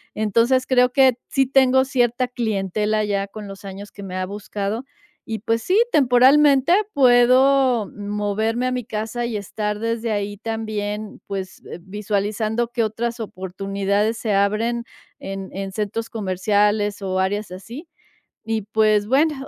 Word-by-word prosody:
entonces 235 Hz, +5 st, +2 dB
creo 250 Hz, -1 st, +3 dB
que 265 Hz, -2 st, +5 dB
sí 270 Hz, -1 st, +2 dB
tengo 265 Hz, 0 st, +4 dB
cierta 250 Hz, -1 st, 0 dB
clientela 215 Hz, -2 st, -1 dB
ya 200 Hz, -1 st, -1 dB
con 210 Hz, +1 st, -9 dB
los 195 Hz, +1 st, -10 dB
años 200 Hz, +1 st, -8 dB
que 200 Hz, -, -10 dB
me 185 Hz, -1 st, -6 dB
ha 185 Hz, 0 st, -1 dB
buscado 205 Hz, +3 st, -4 dB, 0.4 s
y 220 Hz, -1 st, -4 dB
pues 230 Hz, +2 st, -1 dB
sí, 370 Hz, -, +1 dB
temporalmente 275 Hz, +2 st, +5 dB, 0.2 s
puedo 255 Hz, -2 st, +4 dB
moverme 210 Hz, +3 st, -2 dB
a -, -, -1 dB
mi 250 Hz, -1 st, -2 dB
casa 220 Hz, +2 st, -3 dB
y 235 Hz, -2 st, -3 dB
estar 210 Hz, +1 st, -3 dB
desde 230 Hz, 0 st, -2 dB
ahí 205 Hz, -1 st, -2 dB
también, 215 Hz, -1 st, -4 dB
pues, 190 Hz, -2 st, -6 dB, 0.2 s
visualizando 210 Hz, +4 st, -2 dB
que 240 Hz, -1 st, 0 dB
otras 230 Hz, +2 st, -3 dB
oportunidades 195 Hz, +2 st, -2 dB
se 220 Hz, -3 st, -1 dB
abren 215 Hz, +4 st, +1 dB, 0.3 s
en 195 Hz, 0 st, -6 dB
en 195 Hz, 0 st, -5 dB
centros 215 Hz, +2 st, -3 dB
comerciales 205 Hz, +1 st, 0 dB
o 190 Hz, -1 st, -1 dB
áreas 200 Hz, +1 st, -1 dB
así 235 Hz, -, -9 dB, 0.6 s
y 225 Hz, -1 st, -1 dB
pues 215 Hz, 0 st, +2 dB
bueno, 295 Hz, +6 st, +3 dB
215 Hz, 140 wpm, -21 LUFS, 200-240 Hz, 0.6 s, que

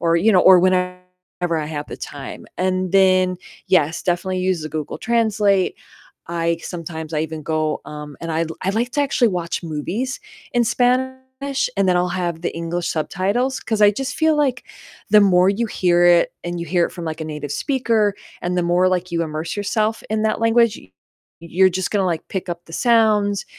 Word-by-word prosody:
or, 170 Hz, 0 st, +2 dB
you 215 Hz, +6 st, +3 dB
know, 180 Hz, -, +5 dB
or 185 Hz, -1 st, +8 dB
whenever 180 Hz, 0 st, +1 dB, 0.6 s
I 150 Hz, -, -3 dB
have 150 Hz, -1 st, -5 dB
the -, -, -7 dB
time -, -, -8 dB
and 185 Hz, 0 st, 0 dB
then 185 Hz, -1 st, +4 dB, 0.3 s
yes, 160 Hz, -4 st, +2 dB
definitely 185 Hz, +1 st, -1 dB
use 185 Hz, -3 st, 0 dB
the 155 Hz, -, -5 dB
Google 155 Hz, -2 st, -4 dB
Translate. 215 Hz, -5 st, +1 dB, 0.5 s
I 170 Hz, 0 st, 0 dB
sometimes 160 Hz, -2 st, -6 dB
I 150 Hz, -, +1 dB
even 160 Hz, -1 st, -4 dB
go, 155 Hz, -1 st, -1 dB
um, 150 Hz, -2 st, -8 dB
and 165 Hz, -1 st, -3 dB
I 165 Hz, +1 st, 0 dB, 0.2 s
I 190 Hz, -, +1 dB
like 235 Hz, +4 st, -1 dB
to 290 Hz, -, +1 dB
actually 260 Hz, -4 st, +2 dB
watch 175 Hz, -2 st, -3 dB
movies 180 Hz, -, -3 dB, 0.3 s
in 240 Hz, -, +3 dB
Spanish, 260 Hz, +3 st, 0 dB
and 195 Hz, -, +2 dB
then 180 Hz, -, +3 dB
I'll 180 Hz, 0 st, +1 dB
have 175 Hz, -2 st, -3 dB
the -, -, -2 dB
English 170 Hz, +1 st, -3 dB
subtitles, 200 Hz, +11 st, -1 dB
'cause 215 Hz, -2 st, -1 dB
I 205 Hz, -, +8 dB
just 270 Hz, +8 st, -4 dB
feel, 315 Hz, -1 st, +3 dB
like, 265 Hz, -5 st, 0 dB, 0.5 s
the 210 Hz, 0 st, +7 dB
more 185 Hz, -1 st, +5 dB
you 230 Hz, +3 st, -1 dB
hear 175 Hz, -4 st, +2 dB
it 175 Hz, -1 st, +4 dB
and 175 Hz, 0 st, -4 dB
you -, -, -3 dB
hear 175 Hz, +1 st, +2 dB
it -, -, -12 dB
from 170 Hz, -2 st, -7 dB
like 160 Hz, 0 st, -5 dB
a -, -, -3 dB
native 150 Hz, -2 st, -5 dB
speaker, 230 Hz, -, +1 dB, 0.3 s
and 180 Hz, +1 st, -1 dB
the 175 Hz, -, +2 dB
more, 175 Hz, +2 st, +3 dB
like, 180 Hz, -1 st, -2 dB
you 170 Hz, -, 0 dB
immerse 155 Hz, +1 st, -4 dB
yourself 215 Hz, +2 st, -1 dB
in 220 Hz, 0 st, 0 dB
that 220 Hz, 0 st, 0 dB
language, 230 Hz, -1 st, +3 dB
y 95 Hz, -, -19 dB, 0.5 s
you're 180 Hz, +3 st, +3 dB
just 185 Hz, +1 st, -2 dB
gonna, 195 Hz, -3 st, +1 dB
like, 165 Hz, -3 st, -2 dB
pick 190 Hz, -2 st, -4 dB
up 170 Hz, 0 st, -5 dB
the 165 Hz, -, -14 dB
sounds, 215 Hz, -3 st, +2 dB
185 Hz, 200 wpm, -20 LUFS, 170-220 Hz, 0.6 s, or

